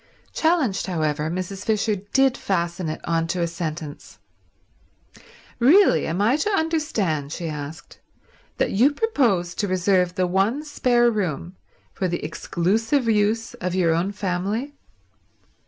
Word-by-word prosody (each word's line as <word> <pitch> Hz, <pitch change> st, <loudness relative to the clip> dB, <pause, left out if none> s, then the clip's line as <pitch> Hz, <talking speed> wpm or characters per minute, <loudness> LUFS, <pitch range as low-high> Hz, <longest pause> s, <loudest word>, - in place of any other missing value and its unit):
Challenged, 315 Hz, -, +1 dB
however, 155 Hz, -3 st, -1 dB
Mrs. 185 Hz, +3 st, -4 dB
Fisher 215 Hz, 0 st, +1 dB
did 250 Hz, +7 st, +1 dB
fasten 170 Hz, -6 st, -2 dB
it 155 Hz, -, -5 dB
on 165 Hz, -1 st, 0 dB
to 180 Hz, +1 st, -2 dB
a -, -, +2 dB
sentence. 160 Hz, -3 st, -6 dB, 1.4 s
"Really 275 Hz, -, +5 dB
am 170 Hz, +4 st, -2 dB
I 240 Hz, +7 st, +3 dB
to 315 Hz, +7 st, 0 dB
understand," 295 Hz, -, -1 dB
she 170 Hz, +1 st, -4 dB
asked, 150 Hz, -1 st, -7 dB, 0.6 s
"that -, -, +1 dB
you 255 Hz, +9 st, +4 dB
propose 235 Hz, -, +1 dB
to 205 Hz, -, -2 dB
reserve 185 Hz, -1 st, +1 dB
the 185 Hz, -, +1 dB
one 200 Hz, -, 0 dB
spare 240 Hz, -5 st, +2 dB
room 180 Hz, -4 st, -3 dB, 0.4 s
for 185 Hz, -, -1 dB
the 175 Hz, -3 st, -3 dB
exclusive 225 Hz, -, 0 dB
use 220 Hz, +1 st, +1 dB
of 180 Hz, 0 st, -4 dB
your 170 Hz, -3 st, +3 dB
own 175 Hz, +4 st, 0 dB
family?" 205 Hz, +7 st, -2 dB
190 Hz, 135 wpm, -23 LUFS, 170-235 Hz, 1.4 s, Really